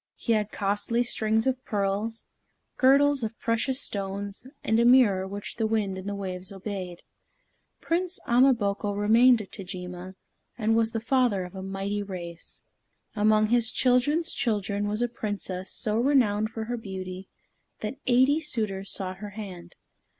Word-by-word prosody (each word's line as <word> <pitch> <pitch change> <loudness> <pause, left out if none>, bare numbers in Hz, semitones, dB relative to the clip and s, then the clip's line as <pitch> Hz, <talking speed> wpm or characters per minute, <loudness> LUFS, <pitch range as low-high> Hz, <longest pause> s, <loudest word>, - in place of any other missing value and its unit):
He 230 - 0
had 215 -1 0
costly 205 +4 0
strings 220 -2 +1
of 260 -1 0
pearls, 205 +2 -2 0.5
girdles 280 0 +4
of 225 +1 -4
precious 235 +3 0
stones, 200 +1 -4 0.2
and 220 +1 +2
a - - +4
mirror 235 -7 +5
which 200 +1 -6
the 225 -2 +1
wind 215 -3 0
and 190 +1 -5
the 200 - -3
waves 185 -1 -5
obeyed. 190 -3 -6 0.8
Prince 355 +2 -1
Ama 255 +2 +5
boko 205 -1 -1
remained 225 +3 +5
at 195 - -16
Tajima, 180 -1 -7 0.4
and 225 -1 +1
was 225 0 +2
the 225 - 0
father 235 -5 +1
of 180 - -9
a 190 - -7
mighty 195 +2 -3
race. 175 -4 -7 0.5
Among 215 0 +3
his 235 -1 +4
children's 270 +8 +2
children 205 -3 -1
was 210 +3 -1
a - - +2
Princess 205 -5 -4
so 215 +1 +1
renowned 230 -5 +3
for 225 0 -5
her 240 +2 -3
beauty 190 -3 -7 0.5
that 215 +5 -4
eighty 260 +4 +4
suitors 215 -10 -1
sought 185 -2 -2
her 205 +1 -7
hand. 180 -5 -8
215 Hz, 155 wpm, -27 LUFS, 195-240 Hz, 0.8 s, mirror